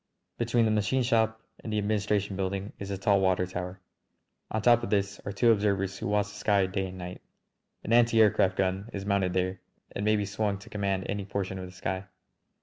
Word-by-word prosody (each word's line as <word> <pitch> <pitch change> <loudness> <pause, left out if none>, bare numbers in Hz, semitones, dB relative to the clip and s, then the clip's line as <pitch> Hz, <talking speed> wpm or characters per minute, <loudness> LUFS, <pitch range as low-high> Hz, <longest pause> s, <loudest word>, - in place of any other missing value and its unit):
Between 120 0 +2
the 110 - +2
machine 110 +5 +1
shop 110 -2 +2 0.2
and 110 - -5
the 105 - 0
administration 105 -1 0
building 95 +2 -3
is 100 - -6
a 100 - -2
tall 100 0 +3
water 95 -1 +2
tower. 90 +1 -5 0.7
On 110 - -1
top 120 +1 +5
of 120 - -4
this 100 -1 0
are 100 - -3
two 115 +4 +4
observers 100 -2 +1
who - - -3
watch 105 0 +1
the - - -12
sky 100 -2 +3
day 95 0 -2
and 95 0 -9
night. 90 0 -7 0.6
An 115 - -1
anti 120 -1 +5
aircraft 95 -3 +4
gun 95 +3 0
is 100 -1 -4
mounted 100 -3 +1
there 95 0 -1 0.3
and 100 - -4
may 110 +1 +3
be 105 -1 0
swung 100 0 -1
to 105 +5 -14
command 100 -2 -1
any 100 0 -2
portion 95 -1 -3
of 90 - -6
the - - -11
sky. 95 +1 -4
100 Hz, 215 wpm, -28 LUFS, 95-110 Hz, 0.7 s, top